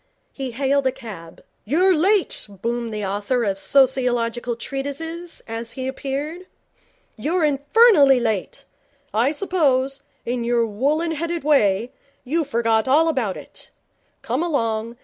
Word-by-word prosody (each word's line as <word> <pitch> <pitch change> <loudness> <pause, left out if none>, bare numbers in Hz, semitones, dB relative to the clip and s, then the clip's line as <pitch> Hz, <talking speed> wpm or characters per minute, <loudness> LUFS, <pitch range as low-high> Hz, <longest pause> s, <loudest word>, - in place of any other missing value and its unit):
He 270 -2 -5
hailed 270 +2 +1
a - - +2
cab. 190 -10 -11 0.2
'You're 355 - +3
late,' 380 - +2
boomed 235 +4 -3
the 210 -1 -3
author 205 +6 -1
of 195 -2 -1
sociological 245 -2 +1
treatises, 305 +7 -5
as 230 0 -6
he 260 -1 -4
appeared. 285 +7 -4 0.7
'You're 320 +9 0
infernally 285 - +5
late. 220 -5 -2 0.5
I 235 +6 +2
suppose, 280 -6 0 0.2
in 240 0 -2
your 235 0 +2
woollen 285 +10 0
headed 335 +1 -3
way, 230 -6 +2 0.3
you 315 +6 0
forgot 230 -5 +1
all 315 +5 +4
about 245 -11 -1
it. - - -10 0.5
Come - - -1
along. 230 -8 -1
265 Hz, 130 wpm, -22 LUFS, 230-305 Hz, 0.7 s, infernally